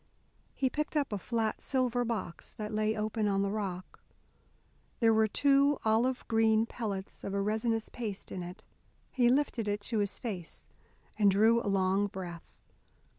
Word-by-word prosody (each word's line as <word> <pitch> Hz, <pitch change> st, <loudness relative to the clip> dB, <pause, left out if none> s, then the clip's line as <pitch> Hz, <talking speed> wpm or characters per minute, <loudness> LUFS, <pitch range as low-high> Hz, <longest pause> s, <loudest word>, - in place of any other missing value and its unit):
He 265 Hz, -, +1 dB
picked 300 Hz, +3 st, -2 dB
up 280 Hz, -7 st, 0 dB
a 205 Hz, -, -2 dB
flat 225 Hz, +1 st, -1 dB
silver 250 Hz, -2 st, +1 dB
box, 225 Hz, -7 st, -4 dB
that 215 Hz, 0 st, -5 dB
lay 215 Hz, 0 st, +1 dB
open 215 Hz, 0 st, -1 dB
on 195 Hz, -1 st, +1 dB
the 200 Hz, -, -1 dB
rock. 190 Hz, -4 st, -4 dB, 1.0 s
There 225 Hz, -1 st, +5 dB
were 220 Hz, 0 st, +4 dB
two 280 Hz, +4 st, +3 dB
olive 235 Hz, +4 st, +1 dB
green 225 Hz, -1 st, +3 dB
pellets 205 Hz, -5 st, -5 dB
of 195 Hz, -, -3 dB
a -, -, +1 dB
resinous 220 Hz, +2 st, 0 dB
paste 215 Hz, -5 st, -6 dB
in 185 Hz, -, -4 dB
it. 180 Hz, +5 st, -8 dB, 0.5 s
He 245 Hz, -2 st, +3 dB
lifted 255 Hz, -4 st, +1 dB
it 205 Hz, 0 st, -1 dB
to 220 Hz, +1 st, -2 dB
his 205 Hz, -1 st, -1 dB
face, 190 Hz, -9 st, -6 dB, 0.5 s
and 205 Hz, -1 st, +6 dB
drew 220 Hz, +4 st, +4 dB
a 205 Hz, -, -2 dB
long 195 Hz, +1 st, +2 dB
breath. 180 Hz, -4 st, -8 dB
215 Hz, 165 wpm, -31 LUFS, 200-235 Hz, 1.0 s, and